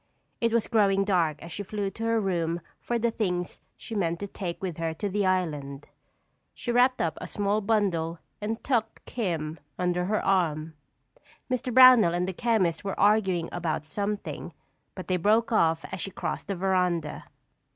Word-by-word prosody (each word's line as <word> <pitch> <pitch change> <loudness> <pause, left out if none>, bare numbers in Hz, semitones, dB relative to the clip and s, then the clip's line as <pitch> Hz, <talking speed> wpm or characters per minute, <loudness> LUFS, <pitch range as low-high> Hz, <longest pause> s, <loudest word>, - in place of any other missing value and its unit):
It 230 -1 +1
was 230 -1 +2
growing 200 -4 +3
dark 170 -6 +1
as 170 - -9
she 205 - -4
flew 205 0 -3
to 225 - -7
her 230 0 +2
room 170 -4 -1 0.2
for 240 - -1
the 235 0 +1
things 180 -6 -2 0.2
she - - -9
meant 170 -5 0
to - - -2
take 185 -3 -5
with 180 -4 -4
her 165 -1 -2
to 205 - -3
the 200 0 0
island. 150 -7 -1 0.7
She 240 - -3
wrapped 250 +2 +4
up 165 - -1
a - - -5
small 205 +1 0
bundle 190 -6 0 0.2
and 220 +2 -3
tucked 230 -4 -1
"Kim" 165 -8 -3 0.2
under 180 0 0
her 215 +3 0
arm. 160 -5 +1 0.8
Mr. 255 0 -1
Brownell 250 -8 +8
and 180 +1 0
the 190 - -3
chemist 200 -6 +1
were 195 -1 -4
arguing 195 -5 +3
about 165 -3 -2
something 200 +5 -4 0.4
but 185 - -7
they 185 - +1
broke 215 +7 +2
off 165 -6 +2
as 190 - -4
she - - -3
crossed 185 - -4
the 195 - -2
veranda. 180 -4 0
190 Hz, 175 wpm, -27 LUFS, 170-215 Hz, 0.8 s, Brownell